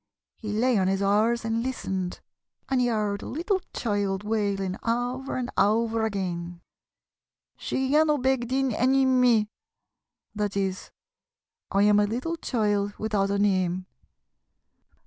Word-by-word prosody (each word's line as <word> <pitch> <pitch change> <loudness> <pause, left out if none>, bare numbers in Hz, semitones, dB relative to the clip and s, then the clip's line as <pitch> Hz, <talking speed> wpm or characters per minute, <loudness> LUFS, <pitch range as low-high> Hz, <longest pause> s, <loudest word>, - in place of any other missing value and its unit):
He 215 -2 -5
lay 230 +1 +2
on 185 - +1
his 195 +1 0
oars 220 +4 +2
and 225 0 0
listened, 190 -8 -3 0.5
and 265 -2 +1
he 245 - +2
heard 210 -3 -1
a - - -7
little 365 - -1
child 205 -3 -1
wailing 200 -3 -1
over 245 +3 -2
and 250 -1 -3
over 225 +2 +2
again: 175 -4 -4 1.0
'She 265 0 -2
lhiannoo 300 0 +4
beg 260 -1 +1
dyn 265 +1 0
ennym 260 +2 +3
mee!' 235 -4 +4 0.9
That 205 -1 -2
is, 190 -1 -2 0.8
'I 200 +1 +2
am 210 0 +5
a 205 - +3
little 255 +10 -2
child 205 -8 -1
without 210 -2 0
a 200 - 0
name!' 185 -2 +1
215 Hz, 135 wpm, -26 LUFS, 200-250 Hz, 1.0 s, am